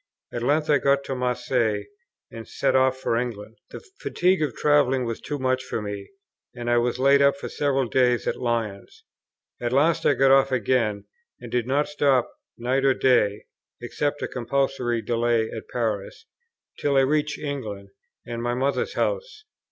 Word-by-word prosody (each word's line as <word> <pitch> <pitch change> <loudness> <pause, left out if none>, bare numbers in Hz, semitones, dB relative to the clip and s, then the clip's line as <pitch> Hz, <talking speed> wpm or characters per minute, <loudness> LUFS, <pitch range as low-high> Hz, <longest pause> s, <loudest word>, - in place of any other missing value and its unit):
At 120 - -3
length 150 +5 +1
I 145 -2 +4
got 140 +1 +2
to 135 - -4
Marseilles, 125 -4 0 0.5
and 115 0 -9
set 135 -1 0
off 130 0 +3
for 130 -3 -1
England. 115 -2 -4
The - - -10
fatigue 185 0 +1
of 145 -6 -1
travelling 135 -4 +2
was 115 -1 -4
too 145 - -4
much 130 -1 0
for 120 - -4
me, 100 -1 -6 0.5
and 120 -1 -3
I 120 - +4
was 120 +1 0
laid 140 +2 +4
up 140 0 +4
for - - -6
several 135 -3 0
days 125 -1 +2
at - - 0
Lyons. 115 -5 -3 0.6
At 120 -1 -1
last 160 +5 +2
I - - +4
got 135 0 +4
off 135 0 +5
again, 115 -4 0 0.3
and - - -10
did 120 -1 0
not 145 +3 +1
stop 140 -4 +1 0.2
night 130 +3 0
or 135 -1 +4
day, 110 -6 +2 0.3
(except 145 0 -3
a - - -1
compulsory 125 -2 -1
delay 115 0 0
at 110 - -7
Paris,) 110 - -3 0.5
till 140 -1 +1
I - - +6
reached 150 +2 0
England, 110 -9 -5 0.4
and 120 -1 -5
my 120 0 -1
mother's 135 +2 -1
house. 485 -3 -2
130 Hz, 175 wpm, -24 LUFS, 120-140 Hz, 0.6 s, I